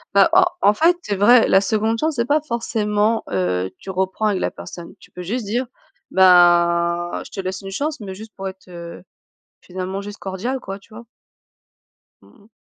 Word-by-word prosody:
Bah -, -, +7 dB
en 375 Hz, 0 st, +7 dB, 0.2 s
en 205 Hz, -, +5 dB
fait 340 Hz, +7 st, +3 dB
c'est 205 Hz, -, -2 dB
vrai, 230 Hz, +4 st, +5 dB
la 190 Hz, -, +5 dB
2de 220 Hz, +2 st, 0 dB
chance 315 Hz, -2 st, 0 dB
c'est 235 Hz, -1 st, 0 dB
pas 295 Hz, +3 st, +2 dB
forcément, 220 Hz, -4 st, -1 dB
heu, 90 Hz, -1 st, -1 dB
tu 190 Hz, -, -8 dB
reprends 190 Hz, +3 st, -2 dB
avec 205 Hz, -3 st, +1 dB
la -, -, 0 dB
personne. 170 Hz, -1 st, -10 dB
Tu -, -, -19 dB
peux 180 Hz, -, -9 dB
juste 220 Hz, +5 st, -3 dB
dire, 240 Hz, +5 st, -2 dB, 0.4 s
ben: 175 Hz, -1 st, +4 dB
«Je -, -, -11 dB
te 195 Hz, -, -9 dB
laisse 190 Hz, 0 st, -4 dB
une 195 Hz, -, -8 dB
chance», 285 Hz, +7 st, -3 dB
mais 190 Hz, -3 st, -7 dB
juste 215 Hz, +2 st, -11 dB
pour 195 Hz, 0 st, -5 dB
être, 190 Hz, 0 st, -10 dB
heu, 170 Hz, 0 st, -9 dB, 0.6 s
finalement 185 Hz, +2 st, -5 dB
juste 205 Hz, +1 st, -9 dB
cordiale 210 Hz, +8 st, -4 dB
quoi, 195 Hz, -2 st, -7 dB
tu 215 Hz, +2 st, -18 dB
vois? 235 Hz, +1 st, -11 dB, 1.2 s
Mmh -, -, -22 dB
mh. 215 Hz, -, -24 dB
200 Hz, 195 wpm, -20 LUFS, 185-230 Hz, 1.2 s, Bah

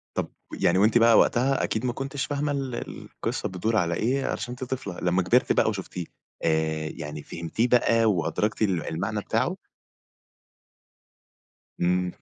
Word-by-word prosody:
طَب -, -, +1 dB, 0.3 s
و -, -, -5 dB
ويعني 85 Hz, +2 st, +3 dB
وأنتِ 110 Hz, +4 st, +5 dB
بقى 115 Hz, -1 st, +6 dB
وقتها 135 Hz, +3 st, +3 dB
أكيد 110 Hz, +3 st, -1 dB
ما 120 Hz, -, +1 dB
كنتيش 135 Hz, +2 st, -3 dB
فاهمة 145 Hz, 0 st, -1 dB
ال 135 Hz, -3 st, -3 dB
القصة -, -, -4 dB
بتدور 110 Hz, +5 st, -1 dB
على 85 Hz, -3 st, +2 dB
إيه، 130 Hz, +8 st, 0 dB
عشان 120 Hz, +2 st, -3 dB
أنتِ 130 Hz, +1 st, -5 dB
طفلة. 125 Hz, -8 st, -5 dB
لمّا 90 Hz, +1 st, +2 dB
كبرتِ 120 Hz, +8 st, +3 dB
بقى -, -, +3 dB
وشُفتيه، 95 Hz, -4 st, -4 dB, 0.4 s
آآ، 80 Hz, -1 st, 0 dB
يعني 75 Hz, -1 st, -6 dB
فهمتيه 85 Hz, +9 st, -2 dB
بقى 115 Hz, -2 st, +4 dB
وأدركتِ 105 Hz, +2 st, 0 dB
ال 95 Hz, -6 st, +1 dB
المعنى 100 Hz, +6 st, -2 dB
بتاعه؟ -, -, 0 dB, 2.2 s
إمم. 90 Hz, 0 st, +1 dB
110 Hz, 150 wpm, -26 LUFS, 85-125 Hz, 2.2 s, بقى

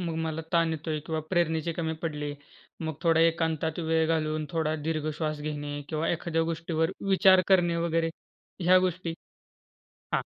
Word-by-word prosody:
मला 160 Hz, 0 st, -2 dB
ताण 165 Hz, -1 st, +3 dB
येतोय 155 Hz, -1 st, -3 dB
किंवा 160 Hz, -1 st, -1 dB
प्रेरणेचे 170 Hz, -2 st, +1 dB
कमी 160 Hz, -1 st, -2 dB
पडले, 150 Hz, -3 st, -3 dB, 0.5 s
मग 160 Hz, -1 st, -3 dB
थोडा 165 Hz, -1 st, +4 dB
एकांतात 160 Hz, -1 st, +1 dB
वेळ 160 Hz, -1 st, +1 dB
घालवून, 155 Hz, -1 st, 0 dB
थोडा 160 Hz, -2 st, 0 dB
दीर्घ 155 Hz, 0 st, -2 dB
श्वास 155 Hz, 0 st, -3 dB
घेणे 145 Hz, -1 st, -4 dB
किंवा 155 Hz, 0 st, -1 dB
एखाद्या 165 Hz, -1 st, 0 dB
गोष्टीवर 165 Hz, 0 st, -1 dB, 0.2 s
विचार 190 Hz, -1 st, +6 dB
करणे 175 Hz, -3 st, +4 dB
वगैरे, 165 Hz, 0 st, +1 dB, 0.5 s
ह्या 185 Hz, +2 st, +6 dB
गोष्टी? 180 Hz, -2 st, -1 dB, 1.0 s
हां. -, -, +3 dB
160 Hz, 145 wpm, -28 LUFS, 155-170 Hz, 1.0 s, विचार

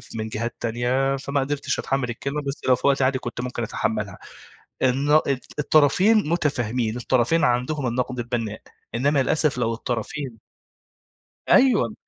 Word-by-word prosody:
من 110 Hz, 0 st, -3 dB
جهات 115 Hz, +2 st, -3 dB
تانية، 125 Hz, +4 st, 0 dB
فما 140 Hz, +1 st, -2 dB
قدرتش 140 Hz, 0 st, -2 dB
أتحمِّل 135 Hz, -2 st, -1 dB
الكلمة 140 Hz, +5 st, -3 dB
بس 140 Hz, 0 st, -5 dB
لو 130 Hz, -, +6 dB
في -, -, -1 dB
وقت 140 Hz, -1 st, +3 dB
عادي 130 Hz, 0 st, +2 dB
كنت 120 Hz, -1 st, -5 dB
ممكن 125 Hz, -1 st, -4 dB
أتحمّلها." 105 Hz, -2 st, -2 dB, 0.6 s
الن 140 Hz, +4 st, +4 dB, 0.4 s
الطرفين 155 Hz, +7 st, +4 dB
مُتفاهمين، 125 Hz, -8 st, 0 dB
الطرفين 130 Hz, +6 st, +1 dB
عندهم 125 Hz, +3 st, +1 dB
النَقد 125 Hz, +1 st, -2 dB
البنّاء، 115 Hz, -3 st, -3 dB, 0.3 s
إنّما 140 Hz, +3 st, +2 dB
للأسف 150 Hz, -1 st, +1 dB
لو 115 Hz, -2 st, 0 dB
الطرفين 120 Hz, +2 st, -4 dB, 1.1 s
أيوه. 250 Hz, -4 st, +4 dB
130 Hz, 135 wpm, -23 LUFS, 120-145 Hz, 1.1 s, لو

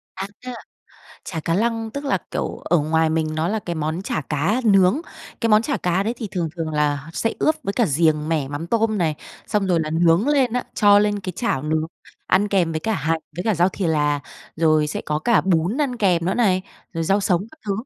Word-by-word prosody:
À, 190 Hz, +1 st, -4 dB, 1.0 s
chả 165 Hz, -, -4 dB
cá 165 Hz, +2 st, -1 dB
lăng 225 Hz, +2 st, 0 dB
tức 280 Hz, +5 st, -6 dB
là, 275 Hz, -, +1 dB
kiểu, -, -, -2 dB
ở 175 Hz, -, +1 dB
ngoài 160 Hz, +1 st, +1 dB
mình 155 Hz, -1 st, -1 dB
nó 160 Hz, +2 st, 0 dB
là 220 Hz, +3 st, 0 dB
cái 175 Hz, -5 st, -5 dB
món 160 Hz, +3 st, -2 dB
chả 175 Hz, -, -2 dB
cá 160 Hz, -, 0 dB
nướng. 195 Hz, +4 st, +4 dB, 0.4 s
Cái 230 Hz, -, +1 dB
món 215 Hz, +1 st, +6 dB
chả 280 Hz, +4 st, -1 dB
cá 180 Hz, +2 st, 0 dB
đấy 225 Hz, +4 st, -2 dB
thì 225 Hz, -3 st, -5 dB
thường 175 Hz, -4 st, -2 dB
thường 165 Hz, -2 st, -2 dB
là 145 Hz, 0 st, 0 dB
sẽ 225 Hz, -, -1 dB
ướp 310 Hz, -, +3 dB
với 200 Hz, -, -2 dB
cả 235 Hz, +2 st, +2 dB
riềng 155 Hz, 0 st, +1 dB
mẻ 155 Hz, -5 st, 0 dB
mắm 145 Hz, +4 st, -5 dB
tôm 220 Hz, +2 st, +1 dB
này, 160 Hz, -4 st, +1 dB, 0.3 s
xong 205 Hz, -2 st, 0 dB
rồi 175 Hz, -3 st, +2 dB
là 155 Hz, -1 st, -3 dB
nướng 170 Hz, -, +3 dB
lên 270 Hz, -5 st, +2 dB
á, 250 Hz, 0 st, -1 dB
cho 205 Hz, -1 st, +6 dB
lên 205 Hz, 0 st, +1 dB
cái 185 Hz, -1 st, -5 dB
chảo 230 Hz, -, -1 dB
nướng, 155 Hz, +1 st, 0 dB, 0.4 s
ăn 200 Hz, +3 st, +2 dB
kèm 180 Hz, -5 st, +1 dB
với 155 Hz, -, -2 dB
cả 220 Hz, +4 st, -1 dB
hành 160 Hz, -1 st, -1 dB, 0.2 s
với 180 Hz, -, -3 dB
cả 220 Hz, -, +2 dB
rau 175 Hz, +1 st, +3 dB
thì 190 Hz, -1 st, -3 dB
là, 150 Hz, -2 st, +1 dB, 0.4 s
rồi 155 Hz, -2 st, +3 dB
sẽ 150 Hz, -, -4 dB
có 150 Hz, 0 st, 0 dB
cả 235 Hz, +8 st, +3 dB
bún 185 Hz, -, +1 dB
ăn 265 Hz, -4 st, 0 dB
kèm 180 Hz, -6 st, +2 dB
nữa 185 Hz, -, 0 dB
này, 190 Hz, -6 st, +2 dB, 0.3 s
rồi 165 Hz, -2 st, -2 dB
rau 195 Hz, +5 st, +2 dB
sống 185 Hz, -2 st, +1 dB
các 315 Hz, -, -18 dB
thứ. 200 Hz, -, 0 dB
180 Hz, 235 wpm, -22 LUFS, 160-210 Hz, 1.0 s, món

